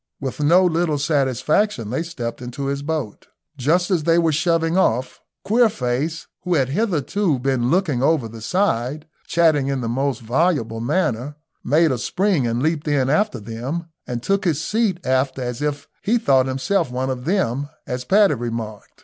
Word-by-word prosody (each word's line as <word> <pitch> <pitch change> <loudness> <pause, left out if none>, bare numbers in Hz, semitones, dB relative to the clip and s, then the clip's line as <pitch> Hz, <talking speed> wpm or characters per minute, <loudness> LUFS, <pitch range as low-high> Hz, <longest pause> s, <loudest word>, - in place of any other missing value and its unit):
With 135 0 -5
no 170 +6 +5
little 165 -3 +1
satisfaction 140 - 0
they 130 - -1
stepped 125 -9 -5
into 125 +3 -5
his 140 0 -2
boat. 145 -8 -4 0.3
Just 165 +8 +1
as 175 -4 +2
they 165 +1 +3
were 165 -1 +3
shoving 165 +2 +1
off, 125 -8 +1 0.3
Queerface, 165 - +1 0.2
who 180 -1 0
had 135 -4 +1
hitherto 185 - 0
been 125 -1 0
looking 160 -7 +1
over 140 -4 +2
the 115 0 -10
side, 150 - 0 0.2
chattering 155 -5 +3
in 135 -2 -1
the 115 - -3
most 130 +1 -1
voluble 120 -2 0
manner, 130 -1 -1 0.3
made 155 +4 +3
a 125 - -1
spring 180 - +1
and 115 +2 -1
leaped 155 -1 0
in 135 -3 +2
after 180 - +1
them, 125 +10 -5 0.2
and 120 -1 -4
took 195 +5 +1
his 165 -6 +1
seat 210 +2 0
aft 130 +1 +1
as 125 0 -4
if 145 -1 -2
he 230 +4 +2
thought 135 - +3
himself 150 +5 0
one 130 +1 -2
of 125 -1 -5
them, 145 - 0 0.2
as 125 0 -4
Paddy 200 +6 +4
remarked. 115 -4 -6
145 Hz, 170 wpm, -21 LUFS, 125-170 Hz, 0.3 s, no